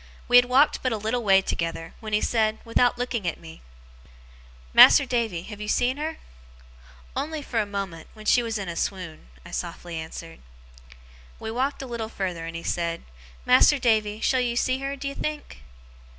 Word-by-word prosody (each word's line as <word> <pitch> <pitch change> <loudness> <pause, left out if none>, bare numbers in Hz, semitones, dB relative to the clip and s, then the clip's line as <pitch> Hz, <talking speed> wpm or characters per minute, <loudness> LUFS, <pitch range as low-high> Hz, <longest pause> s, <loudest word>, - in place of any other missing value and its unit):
We 245 - +7
had 245 - +7
walked 260 +4 +3
but 255 - 0
a 225 - -1
little 220 +3 -2
way 195 -2 +5
together, 165 -1 -3
when 215 -1 -7
he 210 - +2
said, 220 -2 +1
without 240 +2 +2
looking 240 -5 -2
at 170 - -2
me: 160 -1 -12 1.1
'Mas'r 280 - +9
Davy, 230 -9 -1
have 210 +1 -9
you 210 - -5
seen 250 +4 +1
her?' 315 +2 -4 1.0
'Only 310 0 -3
for 235 - -2
a 210 - -4
moment, 195 -5 -5
when 215 0 -13
she 245 - +4
was 225 -2 -3
in 195 -2 -5
a 170 - -5
swoon,' 175 - -4 0.2
I - - -11
softly 170 -2 -5
answered. 165 +1 -8 1.0
We 220 - -5
walked 270 +4 -2
a - - -6
little 235 -3 -5
farther, 180 -6 -4
and 165 - -7
he 165 - -6
said: 170 -1 -2 0.4
'Mas'r 295 - +6
Davy, 215 -4 +1
shall 260 -1 +2
you 240 -1 -1
see 255 +2 +1
her, 275 +1 -3
d'ye 275 0 -5
think? 300 - -5
220 Hz, 185 wpm, -25 LUFS, 185-250 Hz, 1.1 s, Mas'r